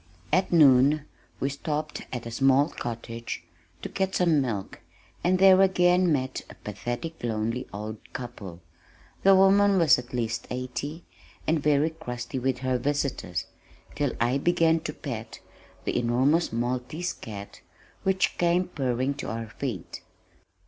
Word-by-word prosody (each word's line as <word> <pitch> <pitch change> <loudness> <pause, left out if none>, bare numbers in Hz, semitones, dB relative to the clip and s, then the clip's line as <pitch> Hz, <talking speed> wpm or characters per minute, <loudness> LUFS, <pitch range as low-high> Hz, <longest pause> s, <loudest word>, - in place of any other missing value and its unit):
At 185 +3 +2
noon 145 -2 +5 0.3
we 135 - 0
stopped 150 +1 -4
at 120 -2 -5
a 115 - -6
small 135 +4 +4
cottage 115 - -6 0.4
to - - -4
get 190 0 -1
some 165 -5 +3
milk, 110 -7 -4 0.4
and 185 +1 +3
there 190 0 +7
again 180 -2 +4
met 130 -3 -1
a - - -11
pathetic 120 - -6
lonely 115 +1 -2
old 105 +2 -6
couple. 105 -8 -8 0.6
The 195 0 +6
woman 195 +1 +5
was 165 -7 +5
at 125 0 -10
least 115 -2 -2
eighty, 130 +6 -4 0.4
and 160 -1 +1
very 150 +2 +3
crusty 125 -5 -5
with 130 0 0
her 130 -1 +1
visitors, 135 -9 -2 0.5
till 145 -3 -1
I 120 +4 +2
began 165 0 +3
to 150 - -3
pet 115 -7 -6 0.5
the - - -1
enormous 130 +8 +2
maltese 125 +8 -2
cat 100 -2 -9 0.4
which 190 0 +1
came 175 +1 +2
purring 130 -3 -1
to - - -5
our 115 -1 -4
feet. 115 -6 -5
135 Hz, 140 wpm, -27 LUFS, 120-165 Hz, 0.6 s, there